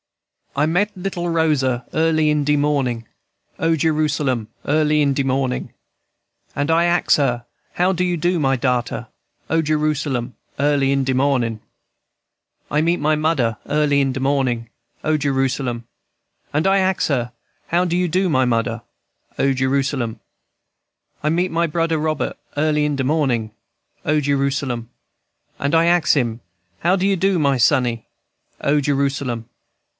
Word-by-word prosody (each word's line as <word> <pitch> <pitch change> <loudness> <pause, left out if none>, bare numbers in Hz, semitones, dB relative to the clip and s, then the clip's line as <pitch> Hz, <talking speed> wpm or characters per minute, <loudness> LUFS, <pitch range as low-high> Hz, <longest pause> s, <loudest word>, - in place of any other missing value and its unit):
"I 145 +2 +2
meet 195 +6 0
little 180 -2 -3
Rosa 140 -7 +1
early 160 -1 +2
in 150 -1 +2
de 150 +1 +2
mornin', 135 -6 0 0.5
O 165 0 +2
Jerusalem! 150 -7 0 0.2
early 150 0 +2
in 140 -1 +2
de 140 - 0
mornin'; 130 -1 -1 0.8
And 145 +1 -1
I 165 +1 +4
ax 175 0 +3
her, 120 -4 0 0.3
How 180 +2 +2
you 180 -1 0
do, 175 +3 +1
my 135 -4 +1
darter? 125 -1 -1 0.4
O 165 0 +2
Jerusalem! 150 -5 -1 0.2
early 140 -1 +2
in 135 -1 +1
de 130 - +1
mornin'. 125 -5 +1 1.1
"I 150 - +1
meet 170 +2 +1
my 155 +1 +2
mudder 145 -8 0
early 145 -1 +2
in 135 -1 +1
de 130 - -4
mornin', 130 -4 0 0.4
O 155 0 +2
Jerusalem! 135 -4 -1 0.6
&c. - - -40
And 155 +5 +1
I 195 0 +4
ax 190 -1 +1
her, 125 -5 -1 0.4
How 175 +1 +2
you 175 0 0
do, 185 +4 +1
my 130 -6 +2
mudder? 115 -1 0 0.6
O 135 0 +3
Jerusalem! 130 -2 0
&c. - - -31 1.0
"I 150 - +2
meet 175 +3 +1 0.2
Brudder 165 -1 0
Robert 155 -1 -2 0.2
early 150 0 +2
in 150 -1 0
de 135 - 0
mornin', 130 -7 0 0.5
O 150 +1 +2
Jerusalem! 135 -4 -1
&c. - - -49
And 140 +3 +2
I 165 +1 +4
ax 170 -2 +3
him, 120 -4 -1 0.4
How 180 +3 +2
you 195 +1 +2
do, 190 0 +1
my 140 -3 +2
sonny? 120 -2 +2 0.5
O 145 +1 +2
Jerusalem! 135 -4 -1
145 Hz, 150 wpm, -20 LUFS, 130-160 Hz, 1.1 s, I